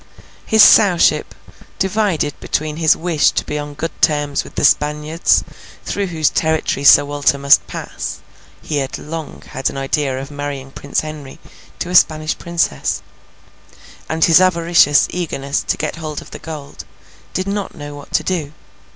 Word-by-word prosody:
His 220 Hz, -1 st, +6 dB
Sowship, 190 Hz, -6 st, +4 dB, 0.4 s
divided 190 Hz, -6 st, 0 dB
between 155 Hz, 0 st, -3 dB
his 160 Hz, -2 st, +4 dB
wish 165 Hz, -3 st, +2 dB
to -, -, -2 dB
be 150 Hz, -, -3 dB
on 145 Hz, 0 st, -7 dB
good 160 Hz, +2 st, -4 dB
terms 145 Hz, -3 st, +1 dB
with -, -, -14 dB
the -, -, +1 dB
Spaniards 150 Hz, +2 st, +2 dB, 0.4 s
through 200 Hz, -1 st, -2 dB
whose 160 Hz, -4 st, 0 dB
territory 160 Hz, -3 st, 0 dB
Sir 140 Hz, -, +7 dB
Walter 145 Hz, 0 st, +1 dB
must 140 Hz, 0 st, +4 dB
pass -, -, -6 dB, 0.5 s
(he 150 Hz, -, -3 dB
had 135 Hz, -2 st, -3 dB
long 160 Hz, 0 st, -7 dB
had 135 Hz, -, -2 dB
an -, -, -8 dB
idea 135 Hz, -1 st, -1 dB
of 135 Hz, +2 st, -8 dB
marrying 145 Hz, -2 st, -6 dB
Prince 140 Hz, +1 st, -2 dB
Henry 155 Hz, -3 st, -9 dB, 0.4 s
to 180 Hz, -, -4 dB
a -, -, -2 dB
Spanish 155 Hz, -2 st, +3 dB
Princess), 170 Hz, -, -2 dB, 1.1 s
and 160 Hz, 0 st, +2 dB
his 170 Hz, +1 st, +6 dB
avaricious 170 Hz, -5 st, +4 dB
eagerness 140 Hz, -6 st, -2 dB
to -, -, 0 dB
get 155 Hz, +1 st, -3 dB
hold 155 Hz, -3 st, -5 dB
of -, -, -14 dB
the -, -, -8 dB
gold, 150 Hz, -3 st, -9 dB, 0.5 s
did 185 Hz, -, -1 dB
not 200 Hz, 0 st, -3 dB
know 145 Hz, -2 st, -8 dB
what 145 Hz, 0 st, -12 dB
to -, -, +2 dB
do. 160 Hz, -6 st, -3 dB
155 Hz, 160 wpm, -18 LUFS, 145-170 Hz, 1.1 s, Sir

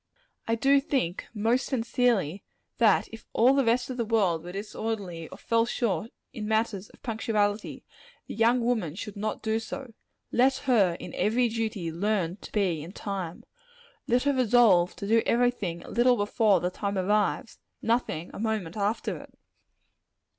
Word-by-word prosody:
I 225 Hz, -, +2 dB
do 275 Hz, +4 st, +4 dB
think, 265 Hz, -, -2 dB
most 230 Hz, +3 st, +1 dB
sincerely, 230 Hz, -, 0 dB, 0.4 s
that 220 Hz, -4 st, +4 dB
if 225 Hz, -, -11 dB
all 245 Hz, +4 st, +5 dB
the 275 Hz, 0 st, +3 dB
rest 245 Hz, +2 st, +1 dB
of 255 Hz, -, -5 dB
the 235 Hz, -, 0 dB
world 200 Hz, -8 st, +1 dB
were 175 Hz, -, -7 dB
disorderly, 200 Hz, -4 st, -4 dB
or -, -, -10 dB
fell 230 Hz, 0 st, +1 dB
short 225 Hz, -4 st, -1 dB, 0.2 s
in 215 Hz, -5 st, -5 dB
matters 220 Hz, -3 st, 0 dB
of -, -, -21 dB
punctuality, 215 Hz, -2 st, -1 dB, 0.4 s
the -, -, -7 dB
young 230 Hz, +3 st, +3 dB
woman 220 Hz, -10 st, 0 dB
should 210 Hz, +1 st, -7 dB
not 215 Hz, +1 st, -3 dB
do 220 Hz, 0 st, +1 dB
so. 250 Hz, +1 st, -7 dB, 0.4 s
Let 260 Hz, +2 st, +4 dB
her, 200 Hz, -10 st, +3 dB
in -, -, -8 dB
every 235 Hz, +3 st, +2 dB
duty, 220 Hz, -6 st, -3 dB
learn 185 Hz, 0 st, -1 dB
to -, -, -12 dB
be 185 Hz, -7 st, 0 dB
in 170 Hz, +5 st, -9 dB
time. 190 Hz, -6 st, -5 dB, 0.6 s
Let 245 Hz, +1 st, +2 dB
her 285 Hz, 0 st, +2 dB
resolve 230 Hz, -8 st, +4 dB
to 200 Hz, -, -6 dB
do 225 Hz, +2 st, +4 dB
every 245 Hz, +1 st, +3 dB
thing 175 Hz, -8 st, -5 dB
a -, -, -11 dB
little 245 Hz, +1 st, +4 dB
before 205 Hz, -2 st, +2 dB
the 180 Hz, -, -1 dB
time 200 Hz, +1 st, -3 dB
arrives; 205 Hz, +3 st, 0 dB, 0.2 s
nothing, 225 Hz, -8 st, -1 dB
a -, -, -8 dB
moment 215 Hz, -6 st, -2 dB
after 210 Hz, +1 st, -1 dB
it. -, -, -14 dB
220 Hz, 170 wpm, -27 LUFS, 195-235 Hz, 0.6 s, all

